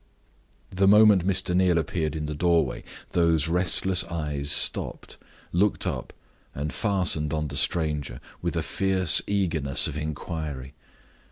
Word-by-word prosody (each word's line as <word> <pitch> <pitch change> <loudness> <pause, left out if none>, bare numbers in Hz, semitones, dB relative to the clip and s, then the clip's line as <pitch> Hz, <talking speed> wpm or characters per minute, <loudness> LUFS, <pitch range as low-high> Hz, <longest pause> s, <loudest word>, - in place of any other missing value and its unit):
The 95 +1 +2
moment 105 -3 +6
Mr. 95 -2 0
Neal 90 -2 +3
appeared 80 -2 -2
in 75 -1 -3
the 75 - -4
doorway, 85 +2 0 0.3
those 85 -3 +2
restless 90 +2 +2
eyes 75 -4 -3
stopped, - - 0 0.3
looked 100 +4 +1
up, - - -4 0.4
and 75 +2 -4
fastened 90 -8 0
on 75 -1 -2
the 70 - -7
stranger 75 -6 -1 0.2
with - - -3
a - - -1
fierce 95 -3 +2
eagerness 80 -9 0
of - - -3
inquiry. 75 -3 -5
85 Hz, 135 wpm, -25 LUFS, 75-95 Hz, 0.4 s, moment